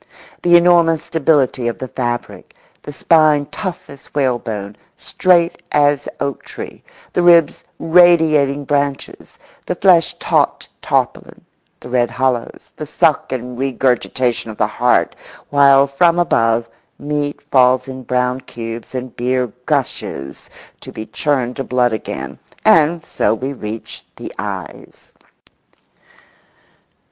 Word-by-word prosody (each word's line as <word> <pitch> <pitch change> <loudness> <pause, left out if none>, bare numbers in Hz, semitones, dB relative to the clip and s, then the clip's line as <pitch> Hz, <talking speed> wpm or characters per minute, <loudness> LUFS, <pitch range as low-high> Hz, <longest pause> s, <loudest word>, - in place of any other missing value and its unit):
The 175 0 +4
enormous 170 -2 +4
stability 140 -7 +1
of 120 - -3
the 130 - -6
fabric; 120 -2 -5 0.3
the - - -8
spine 155 -1 +3
tough 185 -4 -5
as 140 0 -14
whalebone, 115 -7 -2 0.2
straight 175 -2 +1
as 145 -1 +2
oaktree; 140 -1 -6 0.3
the - - +1
ribs 170 -2 +4
radiating 160 -5 +3
branches; 140 -1 -3 0.3
the 180 - -1
flesh 175 -3 +3
taut - - 0
tarpaulin; - - -2 0.4
the - - -10
red 120 -1 +1
hollows; 125 -1 -3
the - - -6
suck - - +1
and 125 -1 -5
regurgitation 125 -2 -1
of 110 - -8
the - - +2
heart; - - +1 0.4
while 140 -1 +5
from 165 +5 +2
above 115 -8 +1 0.3
meat 145 0 -3
falls 130 0 +3
in 130 0 -7
brown 125 +1 -1
cubes 115 +1 -8
and 125 -1 -6
beer 125 -1 -1 0.2
gushes 70 0 -3 0.3
to - - -10
be 110 - -7
churned 130 -4 -2
to 135 - -3
blood 125 -2 +1
again—and 160 - 0
so 105 - 0
we 135 +4 -4
reach 110 -3 -8
the - - -9
eyes. - - -8
135 Hz, 120 wpm, -17 LUFS, 125-155 Hz, 0.4 s, while